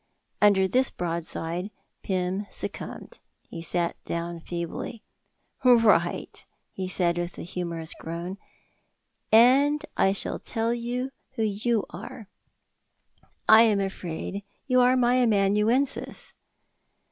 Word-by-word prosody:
'" -, -, -47 dB
Under 200 Hz, -2 st, +5 dB
this 255 Hz, +6 st, +3 dB
broadside 170 Hz, +1 st, -4 dB, 0.3 s
Pym 190 Hz, +1 st, -2 dB
succumbed. -, -, -5 dB, 0.2 s
He 165 Hz, -, -9 dB
sat 170 Hz, +1 st, -2 dB
down 170 Hz, 0 st, -4 dB
feebly. 170 Hz, +7 st, -5 dB, 0.6 s
"Right," 225 Hz, -8 st, +3 dB, 0.3 s
he 190 Hz, -1 st, -4 dB
said, 175 Hz, -2 st, +1 dB
with 175 Hz, 0 st, -4 dB
a -, -, -6 dB
humourous 170 Hz, -2 st, -4 dB
groan, 170 Hz, +4 st, -6 dB, 0.9 s
"and 270 Hz, +6 st, +5 dB
I 195 Hz, -, +3 dB
shall 195 Hz, -, -3 dB
tell 225 Hz, +1 st, -1 dB
you 245 Hz, +2 st, -3 dB, 0.2 s
who 225 Hz, -, 0 dB
you 215 Hz, +1 st, 0 dB
are. 225 Hz, -5 st, -9 dB, 1.2 s
I 220 Hz, +1 st, +9 dB
am 215 Hz, -3 st, +4 dB
afraid 195 Hz, 0 st, -4 dB, 0.2 s
you 255 Hz, -1 st, +4 dB
are 250 Hz, +1 st, +4 dB
my 245 Hz, 0 st, +3 dB
amanuensis!" 220 Hz, +3 st, +1 dB
200 Hz, 110 wpm, -26 LUFS, 175-240 Hz, 1.2 s, I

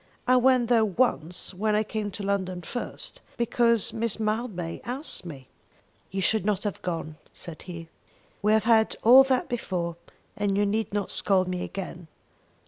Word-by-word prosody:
I 255 Hz, -, +5 dB
went 255 Hz, -1 st, +4 dB
there 230 Hz, -2 st, +4 dB
once 195 Hz, -5 st, 0 dB
when 210 Hz, +3 st, 0 dB
I 215 Hz, -, +3 dB
came 215 Hz, -1 st, -3 dB
to 200 Hz, +1 st, -7 dB
London 185 Hz, -3 st, -1 dB
first, 245 Hz, +9 st, -6 dB, 0.2 s
because 235 Hz, -1 st, +2 dB
Miss 225 Hz, -1 st, -1 dB
Mildmay 215 Hz, -6 st, -2 dB
asked 255 Hz, -, -4 dB
me." 135 Hz, -5 st, -9 dB, 0.6 s
"You 195 Hz, 0 st, -2 dB
should 220 Hz, +1 st, +2 dB
not 205 Hz, -1 st, 0 dB
have 205 Hz, -2 st, -3 dB
gone," 165 Hz, -3 st, -4 dB, 0.2 s
said 170 Hz, -4 st, -9 dB
he. 170 Hz, -2 st, -8 dB, 0.5 s
"We 210 Hz, +1 st, +3 dB
have 220 Hz, -, +3 dB
had 225 Hz, -1 st, +4 dB
all 255 Hz, +4 st, +9 dB
that 260 Hz, -2 st, +1 dB
before, 175 Hz, -8 st, -3 dB, 0.4 s
and 200 Hz, -1 st, 0 dB
you 205 Hz, -, +3 dB
need 215 Hz, +1 st, -1 dB
not 205 Hz, -1 st, -2 dB
scold 185 Hz, -2 st, +2 dB
me 180 Hz, -1 st, -2 dB
again. 180 Hz, -3 st, -6 dB
205 Hz, 165 wpm, -27 LUFS, 180-230 Hz, 0.6 s, all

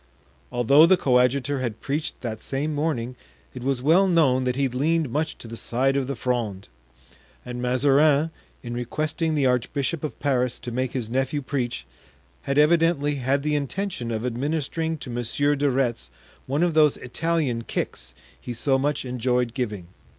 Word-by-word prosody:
Although 140 Hz, +6 st, +6 dB
the 190 Hz, +1 st, +5 dB
coadjutor 130 Hz, 0 st, +2 dB
had 120 Hz, -4 st, -3 dB
preached 150 Hz, +3 st, -3 dB
that 110 Hz, -3 st, -5 dB
same 145 Hz, +3 st, -2 dB
morning 140 Hz, -5 st, -2 dB, 0.4 s
it -, -, -7 dB
was 130 Hz, -1 st, -1 dB
well 175 Hz, +7 st, +5 dB
known 140 Hz, -8 st, +3 dB
that 125 Hz, -1 st, 0 dB
he 135 Hz, 0 st, +1 dB
leaned 145 Hz, +3 st, 0 dB
much 155 Hz, +4 st, -1 dB
to -, -, -9 dB
the 115 Hz, -, -7 dB
side 130 Hz, +4 st, 0 dB
of 135 Hz, -2 st, 0 dB
the 140 Hz, -, -3 dB
Fronde; 115 Hz, -5 st, -2 dB, 0.8 s
and 125 Hz, 0 st, -5 dB
Mazarin, 140 Hz, +5 st, +3 dB, 0.3 s
in 120 Hz, -1 st, -5 dB
requesting 155 Hz, +6 st, -2 dB
the 145 Hz, -2 st, +2 dB
archbishop 135 Hz, +5 st, 0 dB
of 155 Hz, -, -5 dB
Paris 125 Hz, -3 st, +1 dB
to 120 Hz, -, -7 dB
make 130 Hz, +1 st, -2 dB
his 125 Hz, -4 st, -2 dB
nephew 135 Hz, +4 st, -1 dB
preach, 120 Hz, -, -3 dB, 0.6 s
had 140 Hz, -, +1 dB
evidently 150 Hz, -2 st, +3 dB
had 135 Hz, +2 st, 0 dB
the 150 Hz, 0 st, 0 dB
intention 145 Hz, -2 st, -2 dB
of 115 Hz, +1 st, -2 dB
administering 155 Hz, +5 st, -2 dB
to 130 Hz, -, -8 dB
Monsieur 120 Hz, +5 st, 0 dB
de 145 Hz, 0 st, +1 dB
Retz 120 Hz, -, -1 dB, 0.4 s
one 140 Hz, +5 st, +1 dB
of 175 Hz, -2 st, +2 dB
those 155 Hz, -2 st, +4 dB
Italian 140 Hz, -3 st, -1 dB
kicks 60 Hz, -, -4 dB, 0.3 s
he 120 Hz, -, -6 dB
so 135 Hz, +3 st, +1 dB
much 145 Hz, 0 st, -1 dB
enjoyed 125 Hz, -1 st, 0 dB
giving. 105 Hz, -8 st, -3 dB
135 Hz, 165 wpm, -24 LUFS, 125-150 Hz, 0.8 s, Although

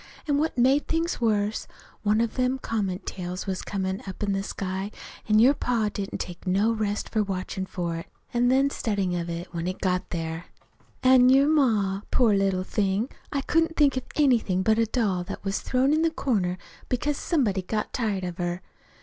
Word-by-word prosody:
An' 285 Hz, -1 st, +2 dB
what 310 Hz, -3 st, -1 dB
made 265 Hz, +4 st, +3 dB
things 330 Hz, -4 st, -1 dB
worse, 210 Hz, -2 st, 0 dB, 0.3 s
one 215 Hz, +1 st, +2 dB
of 230 Hz, -1 st, -1 dB
them 255 Hz, +1 st, +1 dB
comet 205 Hz, -7 st, -3 dB
tails 180 Hz, 0 st, -5 dB
was 190 Hz, -2 st, -2 dB
comin' 190 Hz, -1 st, -3 dB
up 190 Hz, +2 st, -6 dB
in 205 Hz, -, 0 dB
the 195 Hz, -, 0 dB
sky, 195 Hz, 0 st, -4 dB, 0.4 s
an' 215 Hz, -, +5 dB
your 245 Hz, +6 st, +7 dB
pa 235 Hz, -6 st, 0 dB
didn't 195 Hz, -1 st, -4 dB
take 175 Hz, +1 st, -7 dB
no 200 Hz, +5 st, +3 dB
rest 215 Hz, -2 st, -1 dB
for 215 Hz, -, +1 dB
watchin' 190 Hz, -1 st, -3 dB
for 170 Hz, -3 st, -3 dB
it, 165 Hz, -, -7 dB, 0.3 s
an' 240 Hz, 0 st, +3 dB
then 270 Hz, +2 st, +3 dB
studyin' 200 Hz, -8 st, -1 dB
of 175 Hz, -1 st, -2 dB
it 170 Hz, +2 st, -6 dB
when 170 Hz, 0 st, -3 dB
it 185 Hz, -, -3 dB
got 180 Hz, -1 st, 0 dB
here. 165 Hz, 0 st, -4 dB, 0.6 s
"An' 255 Hz, -1 st, +7 dB
your 270 Hz, +2 st, +6 dB
ma 220 Hz, -10 st, +2 dB
poor 235 Hz, -5 st, +3 dB
little 195 Hz, -2 st, +1 dB
thing! 200 Hz, +5 st, 0 dB, 0.2 s
I 280 Hz, -, 0 dB
couldn't 325 Hz, +3 st, +1 dB
think 285 Hz, -3 st, +4 dB
of 260 Hz, -, -3 dB
anything 235 Hz, -10 st, +3 dB
but 220 Hz, +1 st, +3 dB
a 230 Hz, -, +3 dB
doll 205 Hz, -7 st, 0 dB
that -, -, -7 dB
was 195 Hz, 0 st, -1 dB
thrown 265 Hz, +3 st, +2 dB
in 310 Hz, -, +2 dB
the 330 Hz, -, +3 dB
corner 205 Hz, -, -1 dB, 0.3 s
because 285 Hz, +4 st, 0 dB
somebody'd 205 Hz, -, 0 dB
got 215 Hz, -1 st, -2 dB
tired 210 Hz, -7 st, -1 dB
of 180 Hz, 0 st, -5 dB
her. 175 Hz, +1 st, -2 dB
210 Hz, 195 wpm, -26 LUFS, 185-255 Hz, 0.6 s, your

